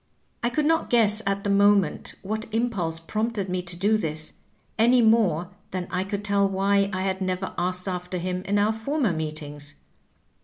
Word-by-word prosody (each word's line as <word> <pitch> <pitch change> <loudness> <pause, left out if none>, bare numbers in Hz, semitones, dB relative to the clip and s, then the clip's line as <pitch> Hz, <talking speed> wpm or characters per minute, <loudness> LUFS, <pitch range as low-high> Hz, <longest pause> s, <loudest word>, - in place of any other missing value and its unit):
I 240 - +1
could 300 +4 0
not 325 +1 +2
guess 220 -3 +3
at 200 0 0
the 205 - 0
moment 200 -3 +3
what 220 +3 -4
impulse 205 -8 0
prompted 215 +3 -2
me 180 0 -1
to 175 0 -4
do 205 +5 +2
this, 155 -4 -3 0.5
any 240 +3 +5
more 215 -7 +3 0.2
than 185 -1 -4
I 180 0 0
could 200 +1 -4
tell 200 -1 +2
why 200 +1 +2
I 185 -1 -2
had 190 0 -2
never 185 0 -2
asked 180 +2 -2
after 180 0 -3
him 180 +1 -2
in 205 +1 +1
our 210 +2 +3
former 235 - 0
meetings. 150 -2 -5
195 Hz, 180 wpm, -25 LUFS, 180-215 Hz, 0.5 s, any